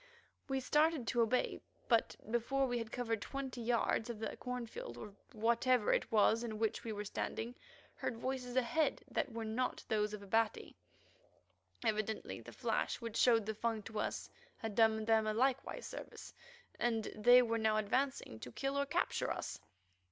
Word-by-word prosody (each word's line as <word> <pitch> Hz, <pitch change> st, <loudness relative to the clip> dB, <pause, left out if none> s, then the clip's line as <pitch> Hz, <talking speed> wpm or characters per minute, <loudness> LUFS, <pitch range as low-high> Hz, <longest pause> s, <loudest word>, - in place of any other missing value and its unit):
We 270 Hz, -1 st, 0 dB
started 300 Hz, 0 st, +2 dB
to 240 Hz, -, +2 dB
obey, 230 Hz, +2 st, +1 dB, 0.3 s
but 230 Hz, -2 st, +3 dB, 0.2 s
before 260 Hz, +4 st, +1 dB
we 245 Hz, -2 st, -1 dB
had 230 Hz, 0 st, -5 dB
covered 230 Hz, -3 st, -1 dB
twenty 265 Hz, -1 st, -5 dB
yards 235 Hz, 0 st, +1 dB
of 235 Hz, -, -4 dB
the 220 Hz, -, -4 dB
cornfield 240 Hz, -, -5 dB
or 200 Hz, +12 st, -8 dB, 0.2 s
whatever 235 Hz, +1 st, +3 dB
it -, -, 0 dB
was 220 Hz, +1 st, +4 dB
in 220 Hz, -2 st, -4 dB
which 220 Hz, 0 st, 0 dB
we 230 Hz, -, -3 dB
were 210 Hz, -1 st, -4 dB
standing, 225 Hz, +3 st, -3 dB, 0.4 s
heard 230 Hz, -, -3 dB
voices 255 Hz, 0 st, -3 dB
ahead 260 Hz, +5 st, +1 dB
that 280 Hz, -4 st, -1 dB
were 225 Hz, 0 st, -4 dB
not 235 Hz, +4 st, -2 dB
those 210 Hz, -1 st, +1 dB
of 205 Hz, -, -10 dB
Abati. 225 Hz, +2 st, 0 dB, 1.1 s
Evidently 215 Hz, 0 st, -1 dB
the -, -, -10 dB
flash -, -, -1 dB
which 230 Hz, -2 st, -6 dB
showed 230 Hz, -4 st, +5 dB
the 220 Hz, -, -2 dB
Fung 220 Hz, 0 st, -1 dB
to 215 Hz, +1 st, -5 dB
us -, -, -2 dB, 0.3 s
had 225 Hz, -2 st, -4 dB
done 220 Hz, 0 st, +4 dB
them 220 Hz, -1 st, +3 dB
a 215 Hz, -, 0 dB
like 260 Hz, +2 st, +3 dB, 0.2 s
service, -, -, -8 dB, 0.5 s
and 225 Hz, -2 st, +1 dB
they 245 Hz, +4 st, +7 dB
were 230 Hz, -1 st, 0 dB
now 220 Hz, -1 st, +3 dB
advancing 215 Hz, -, 0 dB
to 125 Hz, -, -8 dB
kill 275 Hz, -, -1 dB
or 280 Hz, -, 0 dB
capture 345 Hz, +5 st, 0 dB
us. -, -, -4 dB
230 Hz, 170 wpm, -36 LUFS, 220-250 Hz, 1.1 s, they